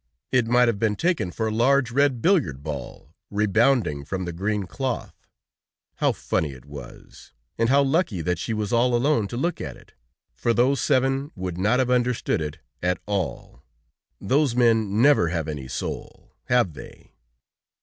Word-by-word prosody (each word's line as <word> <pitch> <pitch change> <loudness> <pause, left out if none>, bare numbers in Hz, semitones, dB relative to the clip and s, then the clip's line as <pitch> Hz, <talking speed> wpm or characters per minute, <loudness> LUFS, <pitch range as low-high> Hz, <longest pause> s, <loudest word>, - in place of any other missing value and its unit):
It 125 -3 +2
might 120 +1 +4
have 115 -4 0
been 110 -1 +1
taken 170 - 0
for 110 +5 -3
a 110 - -1
large 125 +2 +3
red 135 -2 +2
billiard 125 - +2
ball, 75 - -7 0.2
rebounding 105 - +2
from 95 +5 -4
the 85 - -4
green 100 +4 -1
cloth. 125 +6 -5 0.7
How - - +2
funny 75 -3 -2
it 65 0 -14
was! 70 0 -12 0.3
And 115 0 +2
how 140 +1 +5
lucky 135 - 0
that 90 0 -1
she 115 - -3
was 105 -1 -2
all 120 +1 +3
alone 120 -3 +2
to 120 - -6
look 170 +7 -1
at - - -6
it, - - -20 0.4
for 115 -1 0
those 130 +3 +2
seven 135 +2 +1
would 90 -2 -5
not 110 +6 +2
have 130 -1 +1
understood 125 -6 +1
it 75 -1 -4 0.2
at 90 0 +1
all! 100 -6 -4 0.6
Those 135 +3 +1
men 115 -3 +3
never 140 -11 +5
have 80 -2 -2
any 75 -4 -5
soul, - - -6
have 120 -9 +2
they? - - -13
115 Hz, 170 wpm, -24 LUFS, 90-130 Hz, 0.7 s, how